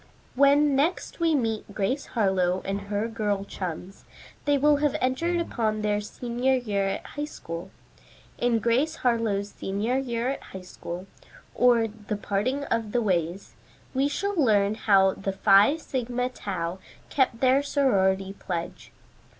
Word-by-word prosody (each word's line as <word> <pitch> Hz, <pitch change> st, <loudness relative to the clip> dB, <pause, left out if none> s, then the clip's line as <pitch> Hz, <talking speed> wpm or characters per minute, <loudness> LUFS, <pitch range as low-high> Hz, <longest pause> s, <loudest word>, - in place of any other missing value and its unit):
When 280 Hz, +1 st, +4 dB
next 315 Hz, +8 st, 0 dB
we 330 Hz, -2 st, +3 dB
meet 225 Hz, -5 st, -2 dB
Grace 210 Hz, +8 st, -1 dB
Harlowe 190 Hz, -3 st, +2 dB
and 195 Hz, +1 st, -2 dB
her 210 Hz, +2 st, 0 dB
girl 210 Hz, -3 st, -2 dB
chums, 185 Hz, 0 st, -6 dB, 0.4 s
they 290 Hz, -1 st, +3 dB
will 295 Hz, +1 st, +4 dB
have 295 Hz, 0 st, +1 dB
entered 335 Hz, +8 st, 0 dB
upon 220 Hz, -9 st, -1 dB
their 210 Hz, 0 st, +1 dB
senior 245 Hz, +4 st, -1 dB
year 205 Hz, -6 st, -1 dB
at 195 Hz, -, -3 dB
High 295 Hz, 0 st, -4 dB
School. 165 Hz, -, -7 dB, 0.7 s
In 240 Hz, -1 st, +2 dB
"GRACE 240 Hz, +8 st, +1 dB
HARLOWE'S 215 Hz, -4 st, +1 dB
SENIOR 215 Hz, +7 st, -1 dB
YEAR 240 Hz, -2 st, -2 dB
AT 275 Hz, -, -3 dB
HIGH 190 Hz, -, -6 dB
SCHOOL; 180 Hz, 0 st, -7 dB, 0.5 s
Or, 240 Hz, -2 st, +4 dB
The 210 Hz, -1 st, -6 dB
Parting 210 Hz, +8 st, -1 dB
of 230 Hz, -5 st, -2 dB
the 245 Hz, -, +2 dB
Ways," 175 Hz, -1 st, -1 dB, 0.4 s
we 270 Hz, +1 st, +2 dB
shall 400 Hz, +8 st, -2 dB
learn 215 Hz, -, +3 dB
how 195 Hz, -3 st, +4 dB
the 195 Hz, 0 st, -4 dB
Phi 200 Hz, +8 st, +5 dB
Sigma 250 Hz, -4 st, -2 dB
Tau 185 Hz, -6 st, -4 dB, 0.3 s
kept 260 Hz, -4 st, +1 dB
their 265 Hz, +2 st, +4 dB
sorority 195 Hz, -10 st, +1 dB
pledge. 175 Hz, -4 st, -6 dB
225 Hz, 145 wpm, -26 LUFS, 195-265 Hz, 0.7 s, Phi